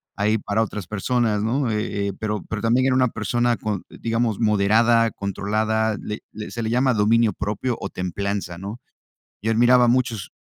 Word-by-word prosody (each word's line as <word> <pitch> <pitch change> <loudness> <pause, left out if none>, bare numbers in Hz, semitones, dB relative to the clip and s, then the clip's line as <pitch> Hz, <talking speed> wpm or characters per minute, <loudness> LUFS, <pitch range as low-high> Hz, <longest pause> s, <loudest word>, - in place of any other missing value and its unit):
ahí 105 +2 +1
para 105 +1 -1
otras 105 -4 -3
personas, 110 0 0
¿no?, 120 +2 0
eh 105 -1 -2
eh, - - -4
pero 105 -3 -2
pero 105 -2 -3
también 120 +3 +2
era 130 - +2
una 130 -1 +4
persona 120 +2 0
con 105 -4 -3
digamos, 115 -2 -1
moderada, 115 +2 +3
controlada, 110 +3 -1
le 105 0 -5
le 105 0 -7
se 115 - -4
le 110 - -1
llama 125 +2 +2
dominio 110 +1 +3
propio 110 +6 -2
o 100 - -4
templanza, 90 0 -3
¿no?, 100 +6 -7 0.6
yo 110 - 0
admiraba 120 +2 +5
mucho 120 -2 +2
su 90 - -7
110 Hz, 180 wpm, -23 LUFS, 105-120 Hz, 0.6 s, admiraba